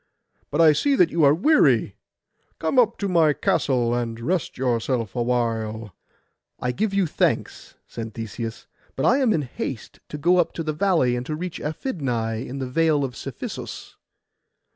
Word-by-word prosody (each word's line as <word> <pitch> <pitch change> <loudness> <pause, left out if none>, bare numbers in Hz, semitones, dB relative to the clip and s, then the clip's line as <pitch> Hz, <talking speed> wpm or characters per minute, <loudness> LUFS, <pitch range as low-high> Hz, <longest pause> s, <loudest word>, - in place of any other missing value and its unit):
But 150 - +1
I 155 -2 +7
see 280 - +2
that 180 -9 +4
you 165 -2 +1
are 140 - +7
weary. 305 - +3 0.6
Come 260 - +1
up 230 -2 +3
to 200 - -2
my 165 -5 +4
castle, 125 -4 +1
and 115 -1 -2
rest 170 +8 -2
yourself 120 -3 -1
awhile.' 115 -4 -1 0.7
'I 125 - -1
give 210 - -1
you 195 -1 +2
thanks,' 155 - -1
said 115 -2 -7
Theseus: 115 0 -6 0.3
'but 135 - -1
I 255 +4 +4
am 255 -5 +3
in 155 -7 +1
haste 125 -1 -6
to 150 - -5
go 175 +5 +3
up 170 -2 +1
the 155 -2 -2
valley, 160 -8 +2
and 120 - -3
to 155 - -2
reach 175 +2 -5
Aphidnai 135 - -2
in 130 +2 -7
the 135 - -3
Vale 155 +2 +2
of 130 -2 -4
Cephisus. - - -7
140 Hz, 165 wpm, -23 LUFS, 120-175 Hz, 0.7 s, I